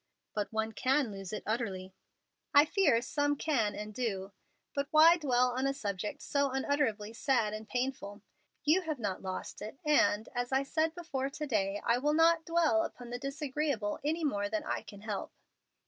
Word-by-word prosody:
"But 210 -1 -2
one 220 0 -1
can 260 +2 +1
lose 195 -2 -7
it 215 - -4
utterly." 195 -5 -3 0.6
"I 285 +1 +9
fear 295 - +3
some 290 +2 0
can 255 -9 0
and 210 0 -6
do. 200 -5 -3 0.4
But 280 0 -1
why 325 +3 +7
dwell 250 -5 +2
on 260 +2 0
a 275 - -1
subject 210 +2 -4
so 280 -1 +1
unutterably 260 -6 0
sad 230 -4 +1
and 215 0 -7
painful? 245 -5 -3 0.4
You 310 +6 +4
have 315 -4 -3
not 205 -6 -3
lost 185 -1 -5
it, 215 +5 -7
and, 230 -7 +3
as 245 +1 -2
I 265 +1 +2
said 315 +3 0
before 285 -6 -3
to 300 +2 -5
day, 205 -6 0
I 235 +1 +3
will 295 +3 +1
not 325 +1 +4
dwell 330 -1 +3
upon 245 -6 -6
the 245 - -4
disagreeable 275 -5 -2
any 320 +3 0
more 205 -9 0
than 215 0 -2
I - - -2
can 200 -1 -12
help." 210 -2 -4
255 Hz, 180 wpm, -32 LUFS, 215-295 Hz, 0.6 s, I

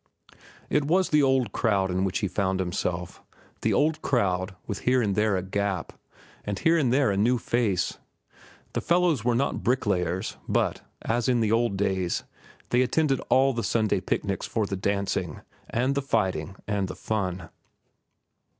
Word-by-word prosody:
It 150 -1 +1
was 180 +5 +2
the 150 -1 +4
old 130 -5 +2
crowd 100 -5 +1
in 95 +1 0
which 95 +2 -1
he - - +1
found 95 0 -1
himself—the 90 -1 -4
old 155 +1 +2
crowd, 95 -6 0
with 100 - -4
here 125 +1 +2
and 105 -5 +1
there 105 -1 +2
a 90 - -2
gap, 100 -2 -2 0.5
and 100 -1 -3
here 165 +8 +3
and 140 -7 +2
there 130 -4 +3
a 95 - -1
new 120 +5 +3
face. 110 -7 0 0.7
The - - -1
fellows 170 - +2
were 120 0 +2
not 135 +4 0
bricklayers, 95 -7 0
but, - - +1 0.2
as 120 +2 0
in 125 -1 +3
the 110 -2 +1
old 115 -3 +2
days, 95 -3 0 0.5
they 125 - +3
attended 135 +1 +2
all 130 +1 +4
Sunday 110 -5 +1
picnics 100 +1 -2
for 110 -2 0
the 100 - -3
dancing, 95 -3 -2 0.3
and 130 +4 +1
the 140 - 0
fighting, 95 - -1
and 100 -2 0
the - - -6
fun. 95 -5 -3
105 Hz, 160 wpm, -26 LUFS, 95-125 Hz, 0.7 s, the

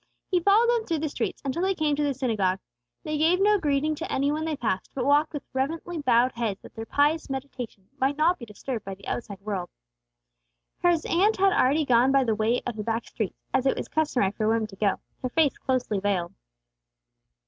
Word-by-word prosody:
He 360 - +4
followed 405 +6 +5
them 470 -2 +1
through 330 - 0
the 310 0 -2
streets - - -3
until 275 +5 -1
they 385 +1 +1
came 305 -3 +1
to 295 - -1
the 285 -2 0
synagogue. 215 -8 0 0.5
They 305 -1 -2
gave 335 +4 +3
no 415 +1 +4
greeting 300 -1 +1
to 325 +2 -5
any 280 +2 +1
one 310 +1 -2
they 315 -2 -2
passed, 220 -7 -2
but 255 -2 -1
walked 290 +2 +3
with 295 -3 -5
reverently 320 +6 -2
bowed 250 -1 +4
heads 225 -5 -2
that - - -13
their 225 0 -7
pious 295 +2 +2
meditation 255 -7 -6
might 275 +2 +1
not 340 +4 +3
be 235 - -7
disturbed 220 +2 -5
by 195 0 -6
the 195 - -16
outside 205 -5 -4
world. 195 -4 -3 1.1
His 345 -3 +3
aunt 400 +6 +2
had 390 0 +4
already 300 -3 +3
gone 250 +1 +4
by 275 -1 +4
the 230 -3 +1
way 220 +3 +1
of 240 -3 -4
the 210 - -3
back 225 +1 -2
streets, 215 -5 -5
as 265 0 +2
it - - +2
was - - -4
customary 270 -11 +1
for 215 +1 -2
women 225 0 +2
to 195 - -11
go, 200 0 +1 0.3
her 255 - -2
face 300 +1 +2
closely 250 -6 0
veiled. 190 -3 -1
270 Hz, 215 wpm, -26 LUFS, 225-315 Hz, 1.1 s, followed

